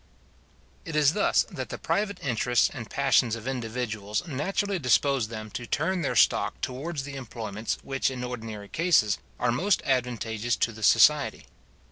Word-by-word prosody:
It 165 - -6
is 150 0 +4
thus 210 - +3
that - - -5
the - - -5
private 200 -2 -1
interests 120 -1 +2
and 120 -6 -7
passions 135 -4 +2
of 115 +1 -8
individuals 115 - -3
naturally 190 +6 -1
dispose 135 -2 +2
them 110 -1 -7
to 120 - -6
turn 175 +5 0
their 145 - -1
stock - - +3
towards 140 +3 -4
the 140 0 -7
employments 115 -5 -4
which 135 0 0
in 125 -2 -5
ordinary 110 -4 -6
cases, 155 - +2 0.2
are 120 - +2
most 185 +12 +1
advantageous 120 -3 0
to 115 - 0
the 110 0 -12
society. - - +4
125 Hz, 155 wpm, -27 LUFS, 115-145 Hz, 0.2 s, is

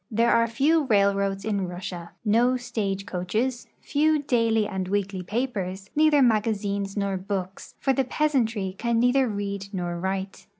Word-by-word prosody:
There 230 +2 +2
are 230 0 +4
few 290 +7 +2
rail 200 -4 +4
roads 195 0 -2
in 200 -4 -1
Russia, 175 -1 -7
no 240 +4 +3
stage 210 -6 -3
coaches, 220 +8 -2
few 310 +2 +2
daily 230 -6 +1
and 190 -2 -3
weekly 200 -1 -1
pa])ers, 195 -2 -3
neither 300 -2 +5
magazines 205 -3 0
nor 200 -1 0
books, 190 0 -5
for 270 - +1
the 270 - +1
peasantry 235 -9 0
can 235 -1 +1
neither 250 +2 +3
read 200 -2 -4
nor 175 -3 -3
write. 190 +1 -4
210 Hz, 155 wpm, -25 LUFS, 195-245 Hz, -, neither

